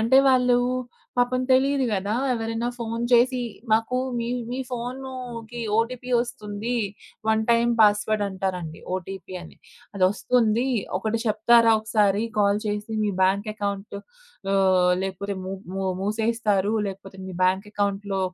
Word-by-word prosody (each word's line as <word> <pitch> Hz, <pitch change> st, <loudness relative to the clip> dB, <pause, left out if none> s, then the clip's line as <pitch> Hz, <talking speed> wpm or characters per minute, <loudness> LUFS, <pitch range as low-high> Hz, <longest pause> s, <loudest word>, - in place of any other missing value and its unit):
అంటే 230 Hz, +4 st, +4 dB
వాళ్ళు 250 Hz, -1 st, +4 dB, 0.6 s
పాపం 245 Hz, +1 st, +2 dB
తెలీదు 270 Hz, +1 st, +3 dB
గదా! 200 Hz, +1 st, -1 dB, 0.2 s
ఎవరైనా 225 Hz, 0 st, -2 dB
ఫోను 230 Hz, 0 st, -3 dB
చేసి 250 Hz, +1 st, +4 dB, 0.3 s
మాకు 225 Hz, +3 st, +2 dB, 0.2 s
మీ 235 Hz, -, -2 dB, 0.2 s
మీ 250 Hz, -, -3 dB
ఫోనుకి 245 Hz, -1 st, -6 dB, 0.2 s
ఓటీపీ 245 Hz, +2 st, -1 dB
ఒస్తుంది. 235 Hz, -1 st, -3 dB, 0.5 s
వన్ 220 Hz, 0 st, +3 dB
టైమ్ 235 Hz, 0 st, +4 dB
పాస్‌వర్డ్ 210 Hz, 0 st, +4 dB
అంటారండి. 185 Hz, -4 st, -4 dB
ఓటీపీ 185 Hz, 0 st, -6 dB
అని. 175 Hz, -, -12 dB, 0.4 s
అదొస్తుంది. 220 Hz, +5 st, +2 dB, 0.3 s
ఒకటి 220 Hz, +3 st, -1 dB
చెప్తారా 230 Hz, +1 st, +5 dB
ఒకసారి 210 Hz, -2 st, +2 dB, 0.2 s
కాల్ 205 Hz, 0 st, +3 dB
చేసి 210 Hz, +1 st, -3 dB
మీ 210 Hz, -, +1 dB
బ్యాంక్ 200 Hz, +3 st, +2 dB
అకౌంట్ 200 Hz, -1 st, -4 dB, 0.6 s
ఆహ్, 185 Hz, -2 st, +4 dB
లేకపోతే 195 Hz, +1 st, -3 dB
ము 190 Hz, +1 st, -4 dB, 0.2 s
మూ 195 Hz, 0 st, -3 dB, 0.2 s
మూసేస్తారు 215 Hz, -1 st, +1 dB
లేకపోతే 195 Hz, 0 st, -8 dB
మీ 190 Hz, -, -7 dB
బ్యాంక్ 190 Hz, +2 st, +2 dB
అకౌంట్‌లో 200 Hz, -1 st, -1 dB
215 Hz, 125 wpm, -24 LUFS, 195-235 Hz, 0.6 s, చెప్తారా